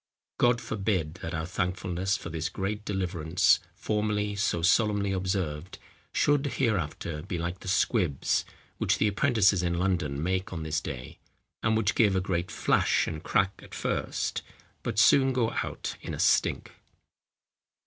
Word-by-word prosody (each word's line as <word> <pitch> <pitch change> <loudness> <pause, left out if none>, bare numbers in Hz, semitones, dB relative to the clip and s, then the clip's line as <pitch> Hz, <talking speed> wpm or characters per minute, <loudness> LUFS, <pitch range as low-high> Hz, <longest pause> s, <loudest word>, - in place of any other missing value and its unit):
God 120 -1 +4
forbid 95 -7 -2
that 85 +1 -4
our 80 0 -2
thankfulness 90 +1 -1
for 85 - -8
this 80 +1 -2
great 105 +3 -3
deliverance, 90 -4 +2 0.2
formerly 105 -1 -1
so 95 -4 0
solemnly 100 +1 +3
observed, 95 -3 -2 0.3
should 145 -1 +2
hereafter 85 - -1
be 90 +2 -4
like 85 +2 -3
the - - -11
squibs 90 - +1 0.4
which - - +2
the 105 - +2
apprentices 105 -3 +3
in 85 -1 0
London 85 -6 0
make 95 +2 -1
on 85 -3 -4
this 80 0 -1
day; 65 0 -7 0.4
and 110 0 +2
which 105 -3 +1
give 105 -4 +3
a - - +3
great 90 -2 -2
flash - - +2
and 80 - -5
crack 95 0 +1
at - - -11
first, - - -2 0.4
but - - -4
soon 130 +3 +5
go 120 -3 +1
out - - -5
in - - -5
a - - -9
stink." - - +2
95 Hz, 150 wpm, -28 LUFS, 85-105 Hz, 0.4 s, soon